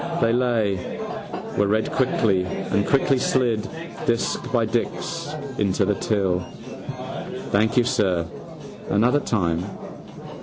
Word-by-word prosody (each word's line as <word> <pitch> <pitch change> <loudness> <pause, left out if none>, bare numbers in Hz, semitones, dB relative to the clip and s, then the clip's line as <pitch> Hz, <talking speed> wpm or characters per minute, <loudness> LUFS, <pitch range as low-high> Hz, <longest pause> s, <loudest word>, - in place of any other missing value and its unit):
They 115 0 +3
lay, 115 -7 0 0.6
were 100 - +4
read 110 +2 +1
quickly 110 -7 +2
and 95 +2 -1
quickly 135 -1 +3
slid, 120 -5 +1 0.4
disc 115 -1 0
by - - +3
disc, - - -2 0.3
into 100 -1 +2
the 105 - +2
till. 95 -4 +1 1.1
—Thank 110 +4 +3
you, 125 - +7
sir. 95 -8 +1 0.6
Another 120 +8 +4
time. 90 - 0
105 Hz, 110 wpm, -24 LUFS, 95-120 Hz, 1.1 s, you